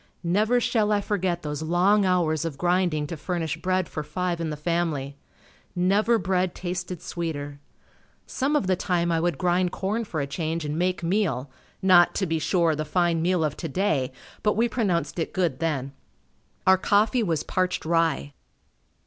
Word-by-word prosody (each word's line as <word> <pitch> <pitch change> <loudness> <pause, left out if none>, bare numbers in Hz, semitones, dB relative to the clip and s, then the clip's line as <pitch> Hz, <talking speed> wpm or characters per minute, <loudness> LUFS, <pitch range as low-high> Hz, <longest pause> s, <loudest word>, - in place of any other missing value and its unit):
Never 210 +8 +2
shall 220 -3 +1
I 205 - +3
forget 190 -4 -1
those 150 -1 -4
long 185 +5 +3
hours 170 -4 +1
of 160 -4 -4
grinding 175 -3 +1
to 170 - -5
furnish 165 -1 -3
bread 185 -1 0
for 155 - -5
five 170 +3 -2
in 165 - -2
the 150 - -4
family. 150 -4 -1 0.6
Never 200 +6 +3
bread 185 -1 0
tasted 180 -1 -5
sweeter. 145 -4 -4 0.7
Some 275 +3 -1
of 295 - +2
the 185 0 +2
time 175 -2 0
I 165 - +2
would 170 -3 0
grind 180 +1 +1
corn 210 +4 -2
for 170 -7 -4
a 140 - 0
change 160 +2 -3
and 150 0 -2
make 180 +2 0
meal, 165 - 0 0.3
not, 180 -2 +6
to 195 - 0
be 165 -2 -1
sure, 170 0 +2
the 155 - -2
fine 170 +1 +1
meal 175 0 +1
of 150 -1 -1
today, 155 -5 -1 0.3
but 210 -1 +1
we 235 +2 +3
pronounced 195 -8 -1
it 165 - -2
good 170 -8 0
then. 145 -5 -1 0.7
Our 190 0 +5
coffee 215 +5 +2
was 165 -8 0
parched 185 -2 -1
rye. 165 -4 +1
175 Hz, 175 wpm, -25 LUFS, 160-190 Hz, 0.7 s, not